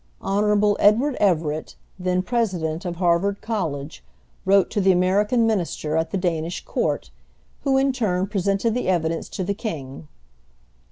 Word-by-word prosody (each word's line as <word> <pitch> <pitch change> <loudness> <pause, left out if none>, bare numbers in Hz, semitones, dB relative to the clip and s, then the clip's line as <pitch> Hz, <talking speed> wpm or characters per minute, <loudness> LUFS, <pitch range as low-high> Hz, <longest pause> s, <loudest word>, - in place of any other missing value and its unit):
Hon. 205 +1 +2
Edward 245 +7 +4
Everett, 160 -6 0 0.2
then 180 0 0
President 185 -7 -1
of 175 -1 -3
Harvard 180 +3 +1
College, 145 - -3 0.4
wrote 195 0 +4
to 210 - 0
the 190 0 +5
American 205 +6 +2
Minister 175 -7 -1
at 160 0 0
the 195 - -2
Danish 170 -2 -2
Court, - - -2 0.5
who 270 -1 +2
in 270 0 +2
turn 190 -7 0
presented 200 +2 0
the 250 - -2
evidence 165 -3 0
to 190 - -4
the 200 +3 -1
King. 155 - -6
190 Hz, 145 wpm, -23 LUFS, 170-210 Hz, 0.5 s, the